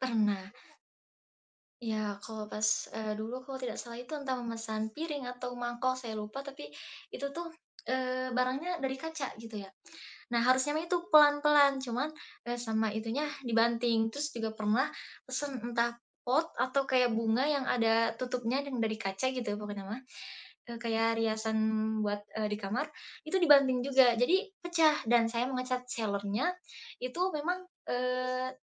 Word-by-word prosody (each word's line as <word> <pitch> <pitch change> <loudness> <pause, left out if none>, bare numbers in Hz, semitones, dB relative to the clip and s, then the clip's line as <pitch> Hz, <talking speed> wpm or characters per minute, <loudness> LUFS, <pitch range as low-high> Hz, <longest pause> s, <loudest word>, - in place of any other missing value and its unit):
Pernah. 210 -6 +1 1.3
Ya 215 -3 -2
kalau 215 -1 -6
pas, 215 0 +1
eee, 215 -1 -3
dulu 230 +5 -5
kalau 265 -1 -6
tidak 240 -4 -3
salah 235 0 -7
itu 250 - -15
entah 275 -2 -2
memesan 225 -2 -3
piring 295 -5 -3
atau 250 0 -5
mangkok 245 +1 -1
saya 235 -4 -6
lupa 215 +6 -5
tapi, 270 - -9 0.4
itu 280 - -4
tuh, 335 +3 -6 0.3
eee, 255 0 -1
barangnya 270 +8 0
dari 265 0 -1
kaca 300 -4 -5
gitu 225 -2 -7
ya, 195 - -10 0.6
nah 235 - +4
harusnya 260 +4 +3
itu 345 +1 +1 0.2
pelan-pelan, 290 -1 +7
cuman, 255 +4 -1 0.4
eee, 240 - -1
sama 220 -1 +1
itunya 225 +7 -1 0.2
dibanting 230 -1 +3
terus 295 +1 -2
juga 225 -2 -3
pernah 215 +4 +2 0.4
pesen 265 -1 -4
entah 235 0 0 0.3
pot 300 +7 +2
atau 260 +2 +2
kayak 250 -2 +4
bunga 230 +4 +2
yang 280 -3 +1
ada 230 -1 +4
tutupnya 250 +1 -1
dan 270 -3 -4
dari 220 -1 0
kaca 195 +6 -1
gitu 245 -4 -3
pokoknya 205 -2 -6
mah, 230 +5 -5 0.7
eee, 235 - -5
kayak 225 0 +1
riasan 220 0 0 0.5
buat, 205 0 -1 0.2
eee, 215 - +1
di 210 - 0
kamar 200 +5 -1 0.4
itu 310 - -5
dibanting 275 -6 +6
juga 260 -3 +6
jadi 335 +10 +5 0.3
pecah 325 -3 +4
dan 235 -1 +6
saya 240 +2 +1
menge-chat 255 -1 -2
seller-nya, 210 - -1 0.5
itu 255 +7 -4 0.2
memang, 360 +5 -2 0.2
eee, 255 +1 -1
245 Hz, 150 wpm, -32 LUFS, 225-270 Hz, 1.3 s, pelan-pelan